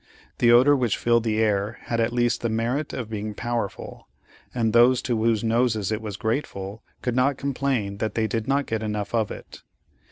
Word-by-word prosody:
The 120 - +5
odor 130 +5 +6
which 125 -6 0
filled 115 -1 +2
the 110 -1 0
air 105 0 0
had 115 - -3
at 115 +1 +1
least 120 0 +1
the 115 - -1
merit 120 +7 -1
of 120 - -5
being 105 0 -4
powerful, 120 -3 -4 0.4
and 115 -3 0
those 120 +2 +6
to 120 - 0
whose 110 -1 +1
noses 115 -3 +1
it 110 0 -2
was 105 -3 -6
grateful, 110 -3 -3 0.2
could 125 -1 -1
not 130 +2 +2
complain 130 -7 -1
that 110 0 -3
they 110 - +1
did 115 0 -2
not 140 +1 +1
get 110 -1 -2
enough 105 -1 -3
of 110 -3 +1
it. - - -10
115 Hz, 195 wpm, -24 LUFS, 110-120 Hz, 0.4 s, odor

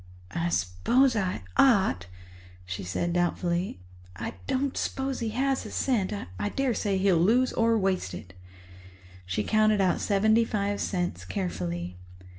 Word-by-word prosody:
"I 85 0 -1
s'pose 90 - +2
I 190 - -1
ought," 190 - +4 0.6
she 90 +1 -5
said 170 - -2
doubtfully. 175 - -1 0.3
"I - - -5
don't 270 +1 0
s'pose 270 -1 -2
he 230 -2 -2
has 265 +4 0
a - - -7
cent. 220 -8 0 0.3
I 100 - -1
daresay 235 -7 0
he'll 190 -2 +3
lose 235 +9 +3
or 230 0 +3
waste 190 - 0
it." 90 - -10 0.9
She 95 +3 -1
counted 215 - +3
out 185 -2 +2
seventy 220 +3 +3
five 205 -2 -1
cents 175 -2 -2
carefully. 90 - -4
195 Hz, 135 wpm, -27 LUFS, -, 0.9 s, ought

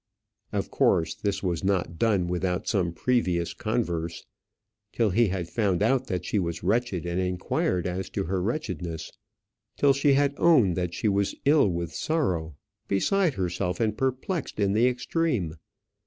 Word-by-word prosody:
Of - - -2
course 80 -1 +2
this 100 -1 -3
was 90 -2 -1
not 90 -4 0
done 100 -6 +2
without 90 +1 -1
some 95 -6 +1
previous 90 -4 0
converse; 85 -8 -2 0.7
till 115 -4 +1
he 115 +4 +3
had 90 -3 -3
found 100 -2 0
out 130 +3 +2
that 90 -2 -3
she 105 - 0
was 85 -2 -3
wretched, 110 -7 0
and 85 +1 -1
inquired 90 -1 -1
as 95 +1 -3
to 100 - +1
her 95 +1 -1
wretchedness; 90 - -3 0.7
till 140 -1 +5
she 140 +1 +3
had 140 0 +3
owned 125 - +4
that 90 -1 -2
she - - -1
was 100 -1 +1
ill 145 -4 +5
with 85 -2 -3
sorrow, 90 - -1 0.3
beside 175 - +2
herself, 90 0 -2
and 110 -2 +1
perplexed 130 - -2
in 100 -1 +2
the 115 +4 +4
extreme. 125 - -1
95 Hz, 155 wpm, -26 LUFS, 90-120 Hz, 0.7 s, till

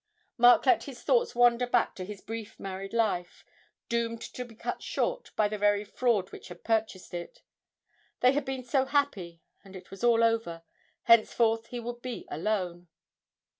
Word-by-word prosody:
Mark 245 0 +6
let 370 -3 +4
his 265 -4 -10
thoughts 485 - +2
wander 245 0 +4
back 245 -1 +2
to 185 - -7
his 200 +1 -8
brief 225 0 -7
married 195 0 -6
life, 200 -6 -1 0.4
doomed 230 -1 -1
to 250 - -7
be 235 -2 -14
cut - - -5
short - - -2
by 215 - +3
the 210 0 -5
very 205 0 +2
fraud 210 -2 0
which - - -10
had 175 -1 -12
purchased 220 -5 -1
it. 175 0 -7 0.8
They 250 - +6
had 290 +1 0
been 265 -1 -4
so 260 +2 +1
happy, 200 - -1 0.2
and 195 -1 -14
it 185 0 -12
was 195 +4 -10
all 230 -1 +4
over 225 -8 0 0.4
henceforth 230 0 +4
he 245 - -6
would 240 +1 -6
be 250 -1 -6
alone. 180 0 -2
225 Hz, 170 wpm, -29 LUFS, 195-245 Hz, 0.8 s, Mark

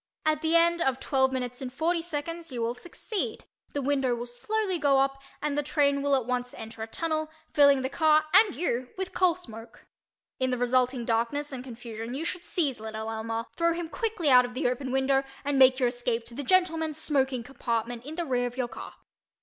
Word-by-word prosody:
At 310 -1 +2
the 320 +1 +2
end 340 0 +4
of 265 -4 +1
twelve 265 -1 +2
minutes 250 -1 -4
and 255 -1 -5
forty 330 +5 0
seconds 330 0 -5
you 240 -2 -2
will 230 +1 0
succeed, 350 - -4 0.3
the 285 - -2
window 270 -3 +1
will 240 0 -5
slowly 375 - -2
go 285 -2 +4
up, 275 0 0 0.2
and 300 -1 0
the 295 - +2
train 285 -1 +2
will 285 0 +3
at 260 -4 0
once 250 0 -2
enter 225 0 -8
a 220 - -3
tunnel, 315 +4 -2 0.2
filling 280 -2 +6
the - - +1
car 310 +1 +4
and 425 -3 +6
you 255 -7 -1
with 380 0 -4
coal 365 -3 +3
smoke. 230 -10 -10 0.5
In 260 0 +1
the 250 - 0
resulting 250 0 +1
darkness 235 +6 0
and 255 -2 -5
confusion 230 -1 -7
you 310 +4 -3
should 355 0 -2
seize 295 -9 -1
little 220 0 -5
Elmer, 225 +1 -3
throw 335 0 +2
him 340 -1 -4
quickly 420 - 0
out 250 -1 +8
of 245 0 -6
the 260 0 +1
open 255 +1 -2
window 270 +1 +2 0.2
and 285 -1 +1
make 260 -1 +7
your 250 -2 +2
escape 240 -1 -2
to 235 - -7
the 275 - -4
gentlemen's 320 -1 +2
smoking 265 -5 +1
compartment 235 -2 -3
in 300 +4 -7
the 345 0 -2
rear 245 -3 0
of 245 +1 -9
your 250 -2 -1
car. - - -9
270 Hz, 215 wpm, -28 LUFS, 245-315 Hz, 0.5 s, out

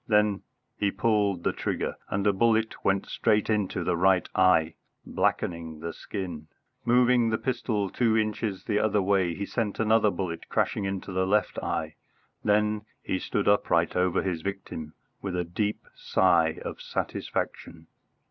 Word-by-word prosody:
Then 105 -2 +3 0.4
he 100 - +2
pulled 100 -4 +1
the - - +1
trigger, - - -2
and 100 +1 -1
a 100 - +4
bullet 110 +2 +1
went 95 0 +2
straight 105 +1 +1
into 100 -4 0
the 90 0 +1
right 95 +1 +3
eye, 90 -4 +4 0.3
blackening 80 -2 -1
the 85 +1 -5
skin. 90 -6 -6 0.4
Moving 120 -1 +4
the 110 - +1
pistol 110 -5 -1
two 110 +3 +1
inches 110 -2 -1
the 105 -1 0
other 105 -1 +2
way, 95 -3 +2
he 100 - -3
sent 105 -2 -2
another 110 -1 +4
bullet 85 -3 -4
crashing 100 - 0
into 95 0 -4
the 95 0 0
left 105 0 +1
eye. - - -3 0.5
Then 105 0 +2 0.2
he 95 - -1
stood 105 - -2
upright 85 -5 +3
over 90 0 +2
his 90 -4 -2
victim 80 -5 -6 0.3
with 95 -3 -3
a 90 - 0
deep 105 +5 -2
sigh 85 -4 +2
of - - -6
satisfaction. 80 -1 -4
100 Hz, 155 wpm, -27 LUFS, 90-105 Hz, 0.5 s, a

